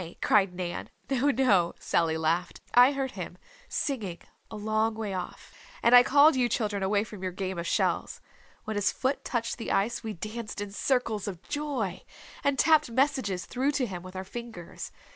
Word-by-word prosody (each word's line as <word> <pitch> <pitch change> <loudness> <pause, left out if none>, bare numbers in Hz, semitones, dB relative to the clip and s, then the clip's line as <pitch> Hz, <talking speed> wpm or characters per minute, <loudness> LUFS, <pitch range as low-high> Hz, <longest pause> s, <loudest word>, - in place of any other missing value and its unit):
cried 200 -3 +3
Nan. 175 -1 -4 0.2
"No, 270 +2 +2
no," 205 -11 +3
Sallv 165 -1 +1
laughed. 165 +3 0
"I 250 +2 +8
heard 270 -1 -2
him, - - -7 0.3
singing, 210 - -2 0.3
a - - -8
long 215 +1 0
way 215 -3 -3
off. 185 -1 -6 0.3
And 235 - +5
I 245 - +11
called 285 +4 +6
you 245 -2 +2
children 210 -3 -1
away 200 +2 +2
from 210 -3 -10
your 185 -1 -2
game 190 -1 -4
of 170 - -3
shells. - - 0 0.4
When 215 -1 -3
his 205 - +2
foot 265 +2 -1
touched 235 0 -2
the - - -3
ice 220 +5 +1
we 220 -1 -4
danced 215 +4 -6
in 205 -1 -4
circles 225 -2 0
of 185 -3 -6
joy, 265 -11 -2 0.4
and 280 -1 +2
tapped 310 -3 +4
messages 255 -7 0
through 270 +4 0
to 270 -3 +1
him 185 -6 -6
with 185 +1 -11
our 185 - -4
fingers. 220 -3 -8
215 Hz, 180 wpm, -28 LUFS, 190-255 Hz, 0.4 s, I